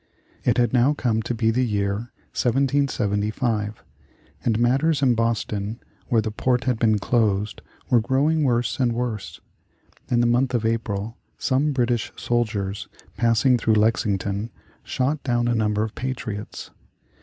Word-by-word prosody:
It -, -, +2 dB
had 120 Hz, -2 st, +2 dB
now 130 Hz, +4 st, +4 dB
come 115 Hz, -5 st, 0 dB
to 120 Hz, -, -3 dB
be 115 Hz, 0 st, +2 dB
the 125 Hz, +3 st, +1 dB
year 105 Hz, 0 st, -1 dB, 0.2 s
1775, 115 Hz, -4 st, 0 dB, 0.6 s
and 115 Hz, -2 st, +1 dB
matters 140 Hz, +5 st, +2 dB
in 125 Hz, -2 st, +5 dB
Boston 115 Hz, -1 st, -1 dB, 0.3 s
where 115 Hz, -4 st, +2 dB
the 110 Hz, -, -2 dB
port 125 Hz, +3 st, 0 dB
had 125 Hz, -3 st, 0 dB
been 110 Hz, -2 st, +3 dB
closed 105 Hz, -2 st, 0 dB, 0.3 s
were 120 Hz, -3 st, +4 dB
growing 145 Hz, +6 st, +2 dB
worse 120 Hz, -2 st, +1 dB
and 120 Hz, -3 st, +2 dB
worse. 115 Hz, -4 st, -4 dB, 0.7 s
In 120 Hz, -, +2 dB
the 120 Hz, -, +3 dB
month 125 Hz, +2 st, +2 dB
of 115 Hz, -2 st, 0 dB
April 110 Hz, -1 st, -2 dB, 0.2 s
some 140 Hz, +3 st, +1 dB
British 120 Hz, -4 st, 0 dB
soldiers 105 Hz, -5 st, -1 dB, 0.3 s
passing 120 Hz, +2 st, +3 dB
through 110 Hz, -1 st, +2 dB
Lexington 105 Hz, -1 st, +1 dB, 0.3 s
shot 140 Hz, +3 st, -1 dB
down 120 Hz, -2 st, 0 dB
a 120 Hz, -, +2 dB
number 105 Hz, -2 st, +1 dB
of 110 Hz, -1 st, -4 dB
patriots. 115 Hz, -5 st, -5 dB
115 Hz, 145 wpm, -23 LUFS, 110-125 Hz, 0.7 s, in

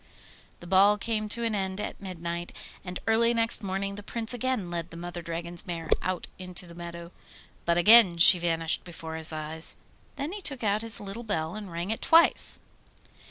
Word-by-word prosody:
The -, -, -10 dB
ball 195 Hz, +3 st, +5 dB
came 215 Hz, 0 st, -3 dB
to 235 Hz, +3 st, 0 dB
an 225 Hz, -1 st, 0 dB
end 190 Hz, -1 st, -2 dB
at 210 Hz, -, -5 dB
midnight, 170 Hz, -2 st, -5 dB, 0.3 s
and 180 Hz, -1 st, -6 dB
early 230 Hz, +1 st, +3 dB
next 230 Hz, 0 st, +2 dB
morning 195 Hz, 0 st, -3 dB
the 205 Hz, -, -7 dB
Prince 230 Hz, +3 st, -3 dB
again 245 Hz, -7 st, -2 dB
led 170 Hz, 0 st, -4 dB
the 165 Hz, -, -10 dB
Mother 175 Hz, 0 st, -6 dB
Dragon's 170 Hz, +1 st, -4 dB
mare 165 Hz, -2 st, -5 dB
out 185 Hz, -1 st, -3 dB
into 180 Hz, 0 st, -5 dB
the 170 Hz, -, -12 dB
meadow. 170 Hz, 0 st, -8 dB, 0.5 s
But 170 Hz, 0 st, +2 dB
again 205 Hz, -1 st, +7 dB
she 175 Hz, +2 st, +9 dB
vanished 165 Hz, -1 st, 0 dB
before 165 Hz, -2 st, -8 dB
his 160 Hz, 0 st, -1 dB
eyes. 155 Hz, +1 st, -1 dB, 0.4 s
Then 285 Hz, +3 st, -4 dB
he 410 Hz, +1 st, -6 dB
took 275 Hz, -8 st, -3 dB
out 210 Hz, 0 st, +1 dB
his 225 Hz, -1 st, +1 dB
little 200 Hz, +3 st, -7 dB
bell 175 Hz, -8 st, -2 dB
and 210 Hz, -4 st, -8 dB
rang 170 Hz, +4 st, -3 dB
it 220 Hz, -, -3 dB
twice. 330 Hz, +1 st, +4 dB
185 Hz, 190 wpm, -27 LUFS, 170-215 Hz, 0.5 s, she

